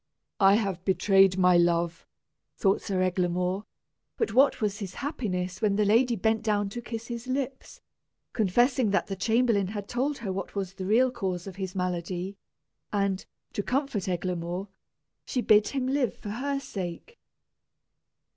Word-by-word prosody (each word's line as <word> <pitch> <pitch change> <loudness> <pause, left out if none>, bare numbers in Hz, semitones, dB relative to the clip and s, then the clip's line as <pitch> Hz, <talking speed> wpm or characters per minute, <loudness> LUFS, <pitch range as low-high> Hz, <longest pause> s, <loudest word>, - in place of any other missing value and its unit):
"I 195 0 +6
have 195 -5 -1
betrayed 190 0 +4
my 180 -1 +5
love," 170 -1 +1 0.5
thought 195 -1 +2
Sir 185 -2 0
Eglamour; 180 +1 0 0.5
but 450 - -1
what 270 +1 +5
was 210 -2 -1
his 190 -3 -6
happiness 185 - -3
when 205 -2 +2
the 210 0 +2
lady 235 +4 +4
bent 220 +2 +1
down 205 -2 0
to 240 +4 -6
kiss 230 -1 -6
his 235 +1 -6
lips, 265 0 -4 0.5
confessing 240 +3 +2
that 200 - +1
the 195 - -4
chamberlain 220 -1 +2
had 205 0 -5
told 275 +4 -1
her 200 -5 -4
what 195 +1 -5
was 195 -2 -3
the 190 -1 -5
real 245 +5 +4
cause 190 -7 -3
of 195 -2 -8
his 190 -1 -4
malady; 180 +1 -3 0.6
and, 200 -2 -1 0.3
to - - -1
comfort 250 -5 -1
Eglamour, 180 +1 -3 0.5
she 255 - -2
bid 215 -3 +5
him 270 -2 -2
live 265 -3 0
for 205 - -8
her 275 +6 -2
sake. 200 - -7
200 Hz, 155 wpm, -28 LUFS, 185-235 Hz, 0.6 s, I